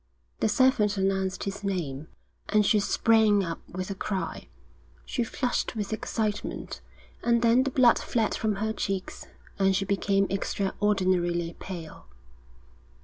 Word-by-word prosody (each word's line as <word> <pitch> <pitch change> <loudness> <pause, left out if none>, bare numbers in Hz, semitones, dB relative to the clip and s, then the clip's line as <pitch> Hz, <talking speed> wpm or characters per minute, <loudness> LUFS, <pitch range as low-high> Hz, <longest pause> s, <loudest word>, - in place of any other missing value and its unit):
The - - +2
servant 215 -4 +3
announced 190 -1 0
his 195 +1 -5
name, 160 -7 -3 0.4
and 210 -1 +3
she 210 - +4
sprang 215 -1 +3
up 165 -2 -4
with 185 +2 -5
a - - -1
cry. 195 0 -4 0.6
She 245 - -1
flushed 245 +1 -2
with 210 -1 -3
excitement, 215 -1 -3 0.4
and 235 0 +2
then 235 +2 +5
the 275 - 0
blood 250 -2 +5
fled 225 -3 0
from 215 -2 0
her 220 +2 -1
cheeks, 195 -3 -4 0.3
and 195 0 +3
she 195 +1 0
became 195 0 +1
extraordinarily 185 -4 0
pale. 165 - -8
200 Hz, 135 wpm, -27 LUFS, 190-220 Hz, 0.6 s, then